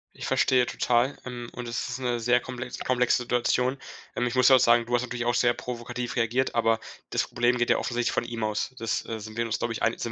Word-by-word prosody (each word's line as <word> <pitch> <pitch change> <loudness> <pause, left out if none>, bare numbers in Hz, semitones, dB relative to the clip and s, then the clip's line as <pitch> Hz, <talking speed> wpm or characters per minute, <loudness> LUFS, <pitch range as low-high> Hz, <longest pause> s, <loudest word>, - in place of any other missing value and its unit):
Ich - - -6
verstehe 125 -2 +3
total, 125 +3 +1
ähm, 120 -1 -6
und 125 -1 -6
es 115 0 -3
ist - - -4
'ne 125 -2 -1
sehr 120 +1 +3
komplex 125 0 -7
komplexe 125 -1 +1
Situation. 125 +2 +1 0.4
Ähm, 125 - 0
ich 120 - -3
muss 125 -1 +4
dir 135 - +8
auch - - +2
sagen, 120 0 +4
du 120 - -5
hast 120 - +3
natürlich 125 -1 -4
auch 120 - +2
sehr 120 0 +3
provokativ 120 0 -5
reagiert. 120 +2 +1
Aber 115 -1 +2 0.3
das - - +1
Problem 120 +1 +1
geht 120 0 +1
ja - - +3
offensichtlich 120 -1 -1
von - - 0
ihm 115 -1 -5
aus. 110 +4 -2
Das, 115 -2 -2
äh, 115 -1 -4
sind 110 +1 -9
wir 115 - +1
uns, 115 - -1
glaube 120 -1 -2
ich - - -6
ei - - +4
sind 115 - -4
120 Hz, 255 wpm, -27 LUFS, 115-125 Hz, 0.4 s, dir